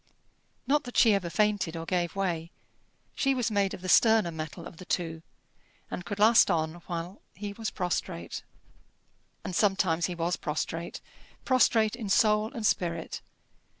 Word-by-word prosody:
Not 295 +1 +2
that 245 - -6
she 225 -3 +6
ever 190 -3 0
fainted 205 -4 +1
or 165 - -5
gave 175 0 -1
way: 170 -4 -2 0.7
she 275 -1 +1
was 240 -3 0
made 200 -2 +1
of - - -13
the 185 - -6
sterner 220 -2 +5
metal 160 +1 -6
of 170 - -10
the 185 - -10
two, 165 -3 -2 0.7
and 180 - -4
could 195 +3 -5
last 220 +2 +6
on 160 -3 0
while 175 +3 -5
he 205 0 -6
was 220 +1 -4
prostrate. 170 - -3 1.0
And 180 - -4
sometimes 190 -4 +2
he 180 - -5
was 170 +1 -1
prostrate 165 +2 -4 0.4
prostrate 235 -4 +3
in 225 -4 -6
soul 210 +2 +3
and 225 -3 -4
spirit. 170 -4 -1
185 Hz, 155 wpm, -28 LUFS, 170-215 Hz, 1.0 s, she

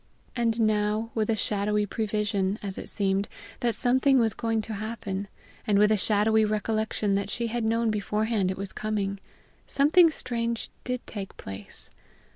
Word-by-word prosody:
And 235 -1 +1
now, 215 +1 +1
with 220 -1 0
a 225 - +3
shadowy 210 0 0
prevision, 210 -1 -1
as 195 -2 -3
it - - -6
seemed, 195 0 0 0.3
that 235 -2 0
something 260 +2 +3
was 225 -3 +3
going 225 -1 -1
to 220 - -5
happen, 205 -2 -4 0.4
and 205 -2 +4
with 210 +1 +5
a - - +5
shadowy 215 +2 +3
recollection 215 -1 0
that 200 0 0
she 235 +2 -2
had 235 0 -2
known 225 0 +1
beforehand 210 -1 0
it 185 - -3
was 195 -1 -5
coming, 200 -2 -2 0.5
something 320 +5 +5
strange 235 -6 -2
did 250 -1 -3
take 195 -3 -7
place. 95 0 -9
215 Hz, 160 wpm, -27 LUFS, 200-230 Hz, 0.5 s, with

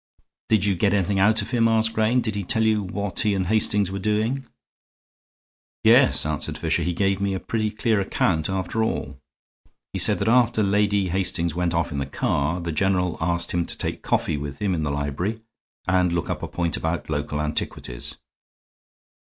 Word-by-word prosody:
"Did 105 -3 +3
you 100 - +2
get 100 +3 +2
anything 100 0 +1
out 110 +2 +4
of - - -8
him?" 115 -2 +3
asked 115 0 +2
Grayne. 110 +3 +2
"Did 110 -3 -2
he 100 -1 -3
tell 110 +4 +1
you 110 -1 +2
what 100 +1 -4
he 105 -2 +2
and 95 -1 0
Hastings 105 -1 +2
were 100 - -3
doing?" 110 +6 -1 1.4
"Yes," - - +5
answered 75 -2 -2
Fisher, - - 0
"he 85 +2 0
gave 95 +2 0
me 100 -1 0
a - - -2
pretty 110 +1 -1
clear 110 0 0
account, 80 -4 0
after 95 +4 -1
all. 70 -10 -3 0.7
He - - -2
said - - +4
that 100 - -2
after 120 -2 +3
Lady 100 -1 +2
Hastings 85 -3 0
went 90 0 -1
off 85 0 0
in 70 - -3
the 70 - -3
car 75 +4 -1
the 85 -1 -3
general 90 +1 +1
asked 85 +1 0
him 85 0 +1
to - - -3
take - - -4
coffee - - 0
with 70 -1 -6
him 100 -3 0
in 80 - -1
the 75 - -1
library 70 +10 -2 0.5
and 90 -1 +2
look 85 - -1
up - - -4
a - - -4
point 85 -3 -1
about - - -2
local 75 - -2
antiquities. 75 -5 -4
95 Hz, 190 wpm, -24 LUFS, 85-105 Hz, 1.4 s, Yes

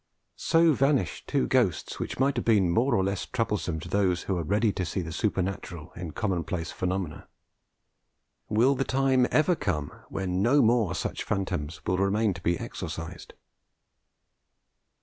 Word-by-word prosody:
So 165 -1 +4
vanish 135 +1 +1
two 140 -2 +1
ghosts 115 -11 +1
which - - -4
might 135 +2 +2
have - - -1
been 100 -6 +3
more 125 +9 +2
or 95 - +2
less 100 0 -2
troublesome 105 -9 -1
to 85 - -8
those 90 -2 +1
who 95 - -1
are 85 - -1
ready 105 +6 +1
to 90 - -2
see 90 +2 -2
the 85 -1 -6
supernatural 90 -3 -3
in 90 -2 -5
commonplace 85 -4 -2
phenomena. 90 -3 -3 1.2
Will 115 +6 +4
the 135 - 0
time 130 -1 +2
ever 165 +3 +3
come 75 - -2 0.2
when 95 -1 -2
no 135 +6 +4
more 110 -5 +2
such - - -3
phantoms 85 -6 -3
will 90 0 0
remain 100 +2 +2
to 85 - -10
be 85 0 +1
exorcised? 85 +2 -7
95 Hz, 155 wpm, -27 LUFS, 85-120 Hz, 1.2 s, So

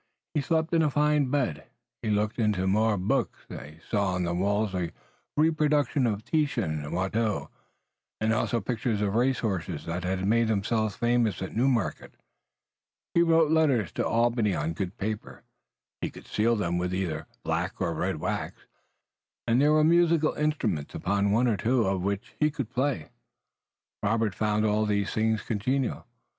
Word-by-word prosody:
He 150 - +1
slept 160 +3 0
in 165 - +4
a 155 - +3
fine 150 -1 +2
bed, 125 - -1 0.4
he 110 - -2
looked 105 +2 0
into 105 -4 +1
more 105 +2 +2
books, 110 +4 -1
he 75 +2 -9
saw 100 -4 0
on 90 - -1
the 85 0 -1
walls 100 +2 0 0.6
reproductions 150 -3 +2
of 105 -1 -2
Titian 120 - 0
and 75 - -6
Watteau, 100 +4 -1 0.7
and 110 +1 +1
also 115 +1 0
pictures 115 0 -2
of 100 -1 0
race 125 +2 +2
horses 100 -7 -3
that 85 +2 -3
had 95 +1 -1
made 115 +3 +3
themselves 110 0 0
famous 120 -4 +1
at 95 - -7
Newmarket, 120 -4 0 1.0
he 170 - +4
wrote 165 -2 +4
letters 140 - +2
to - - -2
Albany 115 -3 +2
on 80 +2 -2
good 95 +4 -4
paper, 105 +1 -5 0.6
he - - -1
could - - -13
seal 115 +2 +1
them 85 -5 -1
with 90 +1 -1
either 80 -5 -3 0.2
black - - -2
or - - 0
red - - -1
wax, - - -4 0.8
and 120 +2 +3
there 150 +1 +4
were 155 0 +4
musical 165 -1 +4
instruments 150 - -1
upon 100 +2 0
one 120 +4 +3
or 110 -4 +1
two 120 +5 +2
of 95 -1 0
which 100 +4 -3
he 150 - +4
could 135 -6 -5
play. 130 - -1 0.9
Robert 110 0 +1
found 105 +2 0
all 105 0 +2
these 100 -1 0
things 110 0 +1
congenial. 125 +4 -1
110 Hz, 165 wpm, -27 LUFS, 100-135 Hz, 1.0 s, in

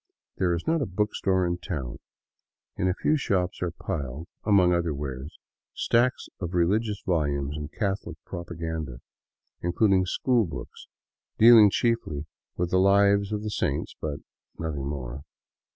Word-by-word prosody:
There 90 -2 +2
is 85 - -5
not 160 -1 +1
a 135 - -1
bookstore 95 -1 0
in 85 0 -1
town. 70 - -5 0.8
In 90 - 0
a 90 - +1
few 155 - +2
shops 90 -9 -1
are 90 - 0
piled, 70 -2 -5 0.2
among 95 -4 +4
other 85 -3 0
wares, 70 +1 -6 0.4
stacks 120 +2 +1
of 90 -1 -4
religious 100 +4 +1
volumes 70 -5 0
and 75 0 -6
Catholic 100 -3 -3
propaganda, 80 -6 -5 0.6
including 95 +1 +2
school 120 +2 +2
books 80 - -9 0.5
dealing 115 -2 +9
chiefly 100 -10 0 0.3
with 90 0 -1
the 95 - +4
lives 100 +1 +4
of 105 0 -2
the 105 - -3
saints; - - -1
but 70 -2 -4 0.4
nothing 75 -5 -3
more. 70 -2 -5
90 Hz, 140 wpm, -27 LUFS, 75-100 Hz, 0.8 s, dealing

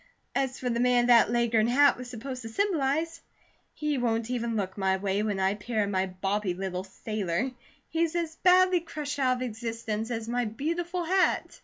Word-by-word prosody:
As 265 -1 -1
for 255 - -3
the 235 -1 0
man 245 0 +3
that 240 -3 +6
Leghorn 235 -2 +2
hat 280 +4 +5
was 250 0 -8
supposed 250 +2 -6
to 225 - -7
symbolize, 325 - 0 0.5
he 300 -3 -1
won't 230 -1 0
even 235 -2 -1
look 190 -3 -2
my 190 -1 +1
way 195 +1 -1
when 210 -2 -1
I 190 0 +2
appear 215 +1 -1
in 200 - -2
my 190 0 +1
bobby 195 +1 -2
little 185 -1 -3
sailor. 210 +3 -2 0.4
He's 330 0 0
as 330 -2 -2
badly 370 0 +5
crushed 300 -3 -5
out 255 -2 +3
of - - -7
existence 225 -1 -4
as 225 -2 -3
my 245 +1 0
beautiful 335 +10 -2
hat." 370 +3 +1
240 Hz, 185 wpm, -28 LUFS, 210-285 Hz, 0.5 s, that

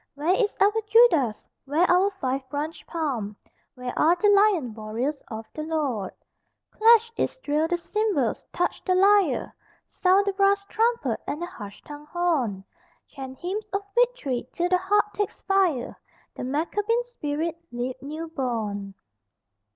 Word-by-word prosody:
Where 305 +5 +1
is 420 0 0
our 405 +1 +5 0.2
Judas? 330 - +4 0.2
Where 310 +6 +2
our 365 +3 +4
five 260 0 -2
branched 295 +3 -5
palm? 255 -11 -3 0.4
Where 250 -1 -5
are 330 +3 +5
the 415 +3 +3
lion 395 - +4
warriors 230 +7 -3
of 220 0 -7
the 310 - -5
Lord? 290 - -2 0.6
Clash, 460 +1 +5
Israel, 310 -9 0
the 350 +1 0
cymbals, 365 - -1
touch 355 - -1
the 370 - +1
lyre, 390 -6 +3 0.3
Sound 380 +2 +2
the 400 - 0
brass 395 0 +2
trumpet 465 +3 0
and 295 - -3
the 345 - -3
harsh 210 - -10
tongued 295 0 -10
horn, 300 - 0 0.5
Chant 265 -2 -8
hymns 395 +7 -4
of 395 0 -1
victory 465 - 0
till 350 +1 -1
the 365 - +4
heart 410 +3 +2
take 415 -1 -1
fire, 375 -10 0 0.4
The - - -6
Maccabean 415 - 0
spirit 330 -8 -3 0.2
leap 245 +1 -4
new 310 +4 -6
born! 215 -9 -3
325 Hz, 145 wpm, -25 LUFS, 260-400 Hz, 0.6 s, our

